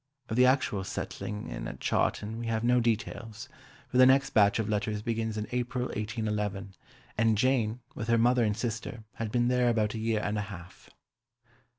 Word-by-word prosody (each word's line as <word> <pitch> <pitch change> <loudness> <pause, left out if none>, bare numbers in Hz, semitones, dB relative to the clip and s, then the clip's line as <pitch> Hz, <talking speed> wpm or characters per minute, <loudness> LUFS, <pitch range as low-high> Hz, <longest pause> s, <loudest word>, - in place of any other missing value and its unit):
Of 110 - -2
the 125 +1 +6
actual 130 -7 +1
settling 105 +2 -5
in - - -5
at - - -8
Chawton 110 +2 0
we 120 - -4
have 110 -1 -1
no 125 +1 +4
details, 115 -1 -2 0.4
for - - -2
the 130 - +9
next 135 +1 +4
batch 100 -2 +4
of 110 -2 -1
letters 105 0 -1
begins 110 -1 -2
in 105 - -2
April 125 0 -1
1811, 105 -2 -3 0.5
and 110 -1 +3
Jane, 125 -1 +1
with 110 - -5
her 115 -1 +4
mother 120 +1 +4
and 105 -1 0
sister, 115 0 -4
had 110 -2 -3
been 120 0 +2
there 125 -1 +3
about 110 -3 +1
a 110 - -4
year 110 -1 0
and 105 0 -1
a 100 0 -4
half. 90 -3 -11
110 Hz, 190 wpm, -29 LUFS, 105-120 Hz, 0.5 s, the